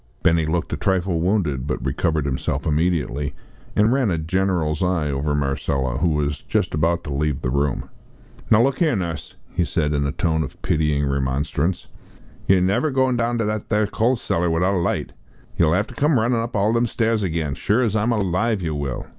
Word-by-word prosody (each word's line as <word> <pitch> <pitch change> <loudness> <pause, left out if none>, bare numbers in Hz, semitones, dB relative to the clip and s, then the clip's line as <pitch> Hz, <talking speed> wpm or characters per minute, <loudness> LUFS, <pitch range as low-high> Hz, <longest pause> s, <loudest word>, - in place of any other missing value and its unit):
Benny 80 -1 +3
looked 85 +1 -1
a - - -1
trifle 95 -3 0
wounded, 85 -8 0
but 75 - -3
recovered 80 -3 0
himself 70 +1 -2
immediately, 75 -3 0 0.4
and 105 +3 +4
ran 130 -5 +2
a 85 - 0
general's 80 -2 0
eye 85 -5 +1
over 75 +2 -1
Marcella 70 -2 -1
who 85 - +2
was 75 -2 -1
just - - -1
about 85 +3 +1
to 75 - -5
leave 75 0 -1
the 65 - -1
room. 70 0 0 0.6
"Now 110 +1 +6
look 135 +4 0
'ere, 155 -7 +3
Nuss," 85 -6 -4 0.2
he 90 - +1
said 75 0 0
in 70 -1 +1
a - - -1
tone 80 -1 0
of 75 - -6
pitying 75 -2 +1
remonstrance, 70 +5 -1 0.6
"yer 95 -1 +5
never 95 +11 +2
a 145 - -2
goin' 130 -1 +2
down 120 0 0
to 115 - 0
that 110 +1 -3
'ere 105 0 +3
coal 115 +5 +1
cellar 85 -6 -1
without 90 +4 +1
a - - +1
light. 85 - -1 0.5
Yer'll 80 0 +4
'ave 100 +4 0
to - - -10
come 145 +1 +2
runnin' 115 +1 +1
up 115 +1 -5
all 105 +2 +2
them 115 +1 +2
stairs 115 -1 0
again 80 -6 -1
sure 105 - +1
as 110 -4 +1
I'm 110 +3 +1
alive 105 +1 +1
yer 80 -2 -1
will!" 70 -4 -3
85 Hz, 205 wpm, -22 LUFS, 75-105 Hz, 0.6 s, Now